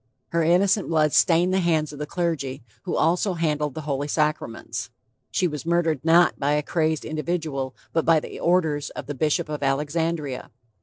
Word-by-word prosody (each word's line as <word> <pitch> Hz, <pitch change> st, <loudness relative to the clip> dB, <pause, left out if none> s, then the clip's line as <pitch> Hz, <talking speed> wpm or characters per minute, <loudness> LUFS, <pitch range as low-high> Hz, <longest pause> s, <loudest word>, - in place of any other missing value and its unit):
Her 170 Hz, -, +1 dB
innocent 185 Hz, +5 st, +3 dB
blood 155 Hz, -3 st, +2 dB
stained 175 Hz, +2 st, +4 dB
the 190 Hz, -, +3 dB
hands 160 Hz, -4 st, +1 dB
of 145 Hz, -, -9 dB
the 150 Hz, -, -4 dB
clergy, 150 Hz, -7 st, -2 dB, 0.2 s
who 180 Hz, -, -2 dB
also 180 Hz, +4 st, +2 dB
handle 150 Hz, -3 st, 0 dB
the 150 Hz, +3 st, -7 dB
Holy 145 Hz, -1 st, -2 dB
Sacraments. 150 Hz, -6 st, -2 dB, 0.4 s
She 180 Hz, -, +1 dB
was 150 Hz, -4 st, -5 dB
murdered 165 Hz, -5 st, +1 dB
not 170 Hz, +1 st, +4 dB
by 145 Hz, +1 st, +1 dB
a 150 Hz, 0 st, +1 dB
crazed 160 Hz, -1 st, 0 dB
individual 155 Hz, -4 st, -3 dB, 0.2 s
but 165 Hz, -, +2 dB
by 165 Hz, -1 st, +4 dB
the -, -, -9 dB
orders 160 Hz, -5 st, +1 dB
of -, -, -7 dB
the 145 Hz, -, -4 dB
bishop 155 Hz, +4 st, 0 dB
of 150 Hz, -1 st, -5 dB
Alexandria. 145 Hz, 0 st, -1 dB
155 Hz, 175 wpm, -24 LUFS, 145-170 Hz, 0.4 s, stained